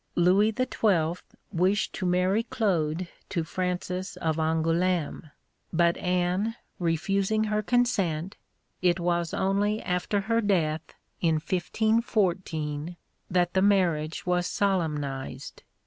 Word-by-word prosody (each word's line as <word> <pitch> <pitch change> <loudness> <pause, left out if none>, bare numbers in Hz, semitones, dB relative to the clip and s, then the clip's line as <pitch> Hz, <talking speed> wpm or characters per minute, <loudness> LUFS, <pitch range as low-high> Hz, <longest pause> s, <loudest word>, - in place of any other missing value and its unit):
Louis 190 +5 +4
XII. 195 -10 +2 0.4
wished 185 +4 +1
to 185 - -2
marry 180 +4 +2
Claude 180 -7 -1 0.2
to 170 - -1
Francis 180 +2 -3
of 160 -1 -1
Angoulême, 165 0 0 0.4
but 170 0 +3
Anne 180 +5 0 0.2
refusing 195 +5 +1
her 210 0 0
consent, 195 -8 0 0.5
it 180 0 +3
was 170 -1 0
only 205 +3 +1
after 180 +3 0
her 230 +3 +1
death, 165 -7 0 0.3
in 165 -2 +3
1514, 175 -4 0 0.3
that 175 -1 +1
the 190 - +3
marriage 175 -6 +2
was 180 0 +1
solemnised. 145 -9 -2
180 Hz, 105 wpm, -27 LUFS, 165-200 Hz, 0.5 s, Louis